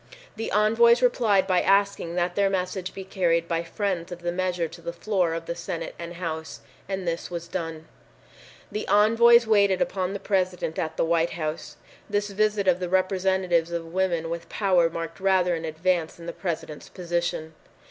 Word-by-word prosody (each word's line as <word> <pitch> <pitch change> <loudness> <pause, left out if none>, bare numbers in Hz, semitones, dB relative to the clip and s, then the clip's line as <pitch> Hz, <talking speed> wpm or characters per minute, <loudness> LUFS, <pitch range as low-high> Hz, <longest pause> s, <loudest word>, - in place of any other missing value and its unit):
The 225 +1 -4
envoys 230 +4 +4
replied 220 -6 +3
by 185 -2 +2
asking 195 -3 +2
that 175 0 0
their 200 +1 +2
message 185 0 -2
be 195 - -7
carried 170 -3 0
by 165 -1 0
friends 180 0 -3
of 175 0 -8
the 175 - 0
measure 180 -1 -1
to 170 +2 -13
the 170 - -4
floor 180 -3 0
of 165 0 -5
the 170 - -3
Senate 170 -1 -5
and 170 0 -7
House, 160 -2 -5 0.3
and 190 -2 -3
this 170 0 -2
was 170 -1 -5
done. 165 -3 -5 0.8
The 210 - -4
envoys 230 +3 +6
waited 200 -4 +3
upon 185 0 -1
the 200 - -4
President 185 -5 -1
at 160 -1 -3
the - - +2
White 165 0 +1
House. 155 -1 -4 0.3
This 205 0 -1
visit 210 -1 +1
of 180 -1 +4
the 180 -1 -3
representatives 185 -2 +1
of 165 -1 -5
women 175 -3 0
with 170 0 -5
power 185 -5 +2
marked 165 +1 -6
rather 190 -2 +3
an 165 -1 -3
advance 165 +1 -1
in 170 - -11
the 170 - -5
President's 160 -4 -5
position. 170 -3 -3
180 Hz, 180 wpm, -25 LUFS, 170-195 Hz, 0.8 s, envoys